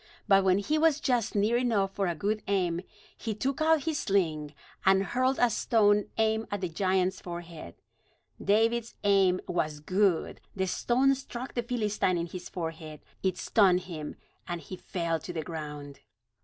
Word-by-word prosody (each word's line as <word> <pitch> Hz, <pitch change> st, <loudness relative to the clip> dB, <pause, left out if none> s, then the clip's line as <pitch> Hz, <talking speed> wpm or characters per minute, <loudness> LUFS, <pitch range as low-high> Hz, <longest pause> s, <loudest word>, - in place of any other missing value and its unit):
But 195 Hz, -2 st, +5 dB
when 185 Hz, 0 st, +4 dB
he 300 Hz, +10 st, 0 dB
was 315 Hz, -2 st, +3 dB
just 245 Hz, -7 st, 0 dB
near 210 Hz, +4 st, +3 dB
enough 220 Hz, -6 st, +1 dB
for 195 Hz, -2 st, 0 dB
a 170 Hz, -, -1 dB
good 210 Hz, +6 st, -1 dB
aim, 180 Hz, -4 st, 0 dB, 0.3 s
he 220 Hz, -2 st, -4 dB
took 270 Hz, +7 st, -2 dB
out 315 Hz, -2 st, +4 dB
his 320 Hz, -2 st, -1 dB
sling, 155 Hz, -7 st, 0 dB, 0.3 s
and 190 Hz, 0 st, +4 dB
hurled 255 Hz, +5 st, +1 dB
a 245 Hz, -1 st, +4 dB
stone 210 Hz, -2 st, +3 dB
aimed 220 Hz, 0 st, +1 dB
at 205 Hz, -1 st, -3 dB
the 180 Hz, -, -2 dB
giant's 185 Hz, +2 st, 0 dB
forehead. 170 Hz, -, -8 dB, 0.7 s
David's 225 Hz, +3 st, +2 dB
aim 195 Hz, -3 st, +3 dB
was 155 Hz, -4 st, -1 dB
good; 185 Hz, +2 st, +1 dB
the 190 Hz, -1 st, 0 dB
stone 255 Hz, +8 st, +2 dB
struck 260 Hz, -1 st, -6 dB
the 240 Hz, -, 0 dB
Philistine 210 Hz, -6 st, 0 dB
in 170 Hz, -, -1 dB
his 175 Hz, +1 st, -8 dB
forehead. 160 Hz, -3 st, -6 dB, 0.2 s
It 190 Hz, -1 st, 0 dB
stunned 185 Hz, -4 st, +3 dB
him, 155 Hz, -5 st, -7 dB, 0.3 s
and 175 Hz, -1 st, -3 dB
he 185 Hz, -, -8 dB
fell 170 Hz, -3 st, -2 dB
to 160 Hz, -, -7 dB
the 160 Hz, -2 st, -4 dB
ground. 150 Hz, -4 st, -7 dB
195 Hz, 170 wpm, -29 LUFS, 175-225 Hz, 0.7 s, But